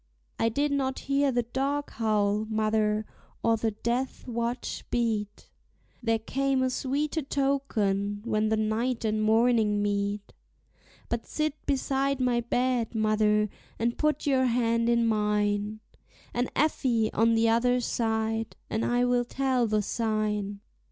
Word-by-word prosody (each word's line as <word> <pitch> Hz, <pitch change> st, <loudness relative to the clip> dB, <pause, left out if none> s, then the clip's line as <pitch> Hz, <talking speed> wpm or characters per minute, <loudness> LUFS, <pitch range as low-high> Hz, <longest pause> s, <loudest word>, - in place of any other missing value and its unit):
I 230 Hz, -, +3 dB
did 285 Hz, +6 st, 0 dB
not 265 Hz, -2 st, 0 dB
hear 275 Hz, 0 st, +1 dB
the 245 Hz, -1 st, +1 dB
dog 275 Hz, +4 st, -2 dB
howl, 215 Hz, -1 st, +1 dB
mother, 215 Hz, -1 st, +1 dB, 0.4 s
or 230 Hz, 0 st, +4 dB
the 225 Hz, 0 st, 0 dB
death 235 Hz, +6 st, -3 dB
watch 235 Hz, +1 st, -3 dB
beat, 215 Hz, -4 st, -2 dB, 0.5 s
There 225 Hz, -1 st, +2 dB
came 270 Hz, +3 st, 0 dB
a 255 Hz, -, +1 dB
sweeter 290 Hz, +5 st, -1 dB
token 215 Hz, -8 st, 0 dB
when 215 Hz, -2 st, +1 dB
the 220 Hz, -, +2 dB
night 225 Hz, +3 st, -1 dB
and 215 Hz, 0 st, 0 dB
morning 220 Hz, -1 st, +3 dB
meet; 205 Hz, 0 st, -2 dB, 0.7 s
But 235 Hz, -1 st, -3 dB
sit 305 Hz, -1 st, -1 dB
beside 275 Hz, 0 st, 0 dB
my 250 Hz, -2 st, +2 dB
bed, 245 Hz, -1 st, 0 dB
mother, 215 Hz, -1 st, +2 dB, 0.3 s
and 235 Hz, +1 st, 0 dB
put 305 Hz, -1 st, 0 dB
your 265 Hz, -2 st, +3 dB
hand 230 Hz, -1 st, +1 dB
in 235 Hz, 0 st, +3 dB
mine, 210 Hz, -1 st, 0 dB, 0.5 s
And 245 Hz, +1 st, 0 dB
Effie 250 Hz, -7 st, +1 dB
on 230 Hz, +1 st, +3 dB
the 225 Hz, 0 st, +3 dB
other 245 Hz, +2 st, +3 dB
side, 225 Hz, -1 st, -1 dB, 0.2 s
and 220 Hz, -, 0 dB
I 245 Hz, 0 st, +2 dB
will 245 Hz, 0 st, +2 dB
tell 255 Hz, -1 st, 0 dB
the 215 Hz, -1 st, +1 dB
sign. 210 Hz, -2 st, -1 dB
230 Hz, 140 wpm, -28 LUFS, 215-255 Hz, 0.7 s, or